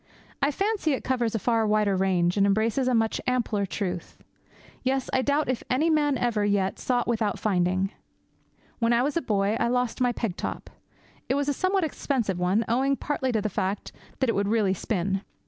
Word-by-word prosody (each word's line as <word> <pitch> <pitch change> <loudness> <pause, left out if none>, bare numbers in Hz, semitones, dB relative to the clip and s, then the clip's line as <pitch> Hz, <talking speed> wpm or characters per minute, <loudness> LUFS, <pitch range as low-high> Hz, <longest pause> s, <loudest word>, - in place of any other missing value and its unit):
I 280 - +3
fancy 390 0 0
it 265 - -3
covers 240 -4 0
a - - +3
far 225 0 +1
wider 210 -2 +2
range, 180 -2 +2
and 200 -1 +3
embraces 220 +6 +1
a 255 - +3
much 225 -1 +1
ampler 225 -5 0
truth. 180 -3 -4 0.6
Yes, 265 0 -1
I 260 - +3
doubt 285 +3 +1
if 255 -1 -1
any 305 +6 +2
man 295 -3 +2
ever 235 -4 0
yet 200 -2 0
sought 245 -1 0
without 220 -4 0
finding. 185 -1 +1 0.9
When 230 0 +3
I 235 +1 +3
was 290 +3 -1
a 335 - +1
boy 205 -3 +1
I - - +2
lost 250 0 -1
my 245 -1 +3
peg 225 -6 -3
top. - - -5 0.6
It 265 - +2
was 285 0 0
a - - +2
somewhat 370 +5 +1
expensive 245 - -1
one, 190 +6 +1
owing 265 +4 +2
partly 270 -2 -2
to 215 -2 0
the - - +1
fact 195 0 -2 0.3
that 265 - +2
it 230 - +2
would 200 0 0
really 210 -3 +2
spin. 195 0 -1
230 Hz, 200 wpm, -26 LUFS, 200-260 Hz, 0.9 s, I